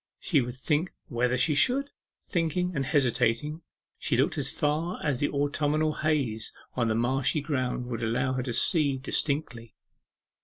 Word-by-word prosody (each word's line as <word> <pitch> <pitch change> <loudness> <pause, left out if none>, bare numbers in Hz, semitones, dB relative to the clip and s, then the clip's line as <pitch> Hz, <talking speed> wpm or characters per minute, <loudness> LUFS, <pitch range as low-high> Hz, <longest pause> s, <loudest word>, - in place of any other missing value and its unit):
She 150 -7 +2
would 120 0 -5
think 150 +6 -1
whether 125 0 +1
she 150 +4 +3 0.2
would. 280 +2 -2 0.3
Thinking, 180 0 -1
and 135 -2 -1
hesitating, 140 +2 +1 0.4
she - - 0
looked - - +2
as - - +1
far 155 +4 -1
as 145 -5 0
the 145 - +1
autumnal 145 +2 0
haze 140 -9 -1 0.2
on 120 -2 0
the 110 - +1
marshy 130 +6 +1
ground 130 -4 -2
would 120 -2 -4
allow 125 +3 0
her 130 - -1
to 125 -1 -4
see 145 0 +3
distinctly. 130 -4 -2
140 Hz, 155 wpm, -28 LUFS, 125-155 Hz, 0.4 s, she